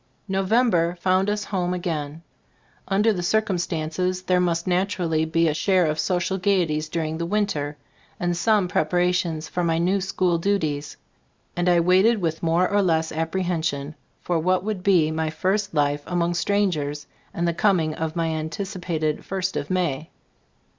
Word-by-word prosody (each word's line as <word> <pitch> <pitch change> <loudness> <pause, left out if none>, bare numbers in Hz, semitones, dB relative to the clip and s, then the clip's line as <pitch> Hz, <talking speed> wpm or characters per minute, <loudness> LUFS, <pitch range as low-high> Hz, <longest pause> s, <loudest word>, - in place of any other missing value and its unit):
November 195 -3 +2
found 185 +2 +2
us 210 0 -1
home 180 -2 -2
again. 160 -3 -4 0.6
Under 210 +3 +3
the 180 - -3
circumstances, 180 -2 -1
there 180 -1 +2
must 170 -1 0
naturally 180 -4 0
be 165 +1 +2
a 155 - +1
share 185 +3 +2
of 155 0 -1
social 185 +1 0
gayeties 170 -5 +1
during 160 0 -2
the 170 - -1
winter, 170 -8 -1 0.4
and 175 0 0
some 205 +1 +2
prepara 180 +1 +1
tions 165 -3 -2
for 180 - -2
my 165 -1 +1
new 185 +4 +1
school 180 -2 0
duties; 160 -6 -1 0.6
and 175 +1 +1
I 175 -1 +4
waited 190 +6 +4
with 165 -3 -2
more 170 +2 +2
or 205 0 +2
less 160 -4 +1
apprehension 160 -3 -2 0.3
for 175 -2 0
what 185 +2 +1
would 210 -3 -3
be 180 -5 +3
my 160 0 -1
first 190 +4 -1
life 145 0 +1
among 175 -1 0
strangers, 170 -6 0 0.3
and 170 0 -1
the 170 - +1
coming 170 -3 +2
of 160 +1 -4
my 165 -1 0
an 160 -1 -2
ticipated 170 -5 -3
"First 190 -1 -3
of - - -3
May." 170 -4 -1
175 Hz, 160 wpm, -23 LUFS, 160-190 Hz, 0.6 s, I